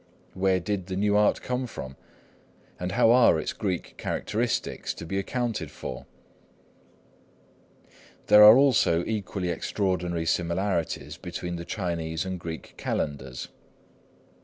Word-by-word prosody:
Where 95 0 +2
did 95 0 -3
the 95 - -4
new 105 +1 +1
art 105 0 +3
come 125 0 -2
from? 65 - -8 0.8
And 90 +1 -3
how 115 - +5
are 120 -9 +5
its - - -3
Greek 95 -5 -3
characteristics 115 +2 -2
to - - -8
be 95 +4 -2
accounted 115 - -2
for? - - -8 2.2
There 105 0 +8
are 105 +3 +10
also 110 -11 +3
equally 100 -4 -3
extraordinary 90 -2 -1
similarities 85 +1 -1
between 90 0 -5
the 85 - -7
Chinese 85 -4 -3
and 95 -1 -4
Greek 80 -1 -7
calendars. 65 -3 -3
95 Hz, 120 wpm, -26 LUFS, 85-105 Hz, 2.2 s, are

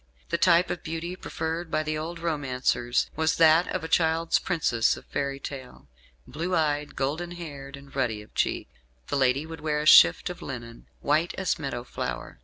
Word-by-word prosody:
The 170 - +1
type 175 0 +4
of 175 - -4
beauty 165 +2 -5
preferred 165 -2 -4
by 155 0 0
the 155 0 -2
old 160 +3 -4
romancers 130 -7 0
was 160 +1 +1
that 165 +1 +5
of 185 - -3
a - - -3
child's 160 0 +2
princess 135 -10 +1
of - - -13
fairy 140 0 -3
tale 130 -2 -8 0.4
blue 175 +4 -3
eyed, 150 -2 0
golden 155 +6 -2
haired, 140 -5 -8
and 140 -1 -15
ruddy 115 -6 -1
of - - -21
cheek. - - -1 0.4
The - - -1
lady 135 +2 +2
would 160 -1 -9
wear 150 -1 0
a 150 - -3
shift 85 - +7
of 180 - -10
linen, 120 -3 -8
"white 155 +4 +1
as 190 -3 -1
meadow 135 -5 -4
flower." 65 - -5
155 Hz, 185 wpm, -26 LUFS, 135-165 Hz, 0.4 s, shift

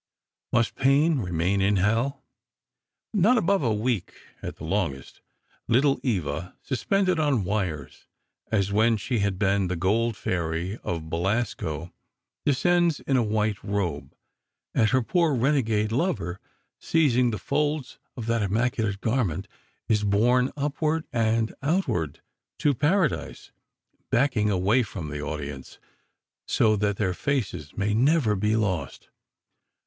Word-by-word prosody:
Must 120 -1 +2
Payne 140 +3 +3
remain 90 0 0
in 100 +1 +3
Hell? 115 +8 0 0.9
Not 215 +5 +4
above 200 -3 +2
a 120 -5 +1
week, 110 -2 -1 0.3
at - - -6
the - - -12
longest. 80 -7 -3 0.5
"Little 135 +4 +3
Eva," 90 - -2
suspended 185 - +1
on 145 -8 +2
wires, 90 -8 -3 0.4
as 100 -3 +1
when 110 +2 +3
she 120 +3 -2
had 100 -2 0
been 100 -1 +1
the 90 - -2
Gold 105 +5 +1
Fairy 85 +3 -2
of 80 -2 -3
Belasco, 85 -4 -2 0.5
descends 170 +3 +2
in 135 - 0
a 125 - +4
white 110 -2 -1
robe, 95 -7 -3 0.6
and 110 - +3
her 130 -1 +2
poor 165 +2 +2
renegade 115 -5 +1
lover, 115 - -1 0.4
seizing 125 -7 +2
the 110 - -2
folds 145 +4 -2 0.2
of 115 - -4
that 115 0 +1
immaculate 110 0 0
garment, 110 -7 -1 0.4
is 105 -1 +2
borne 120 +6 +3
upward 150 +2 -1
and 115 -1 +1
outward 135 - -1 0.4
to 145 - +2
Paradise, 150 +5 0 0.6
backing 120 -4 +2
away 100 +6 +3
from 95 -8 -5
the 75 0 -5
audience, 70 -2 -6 0.7
so 110 -1 +3
that 100 -1 0
their 95 -4 0
faces 95 - -3
may 105 0 0
never 125 -1 +3
be 105 +3 +1
lost. 100 -6 -2
110 Hz, 130 wpm, -26 LUFS, 95-135 Hz, 0.9 s, Not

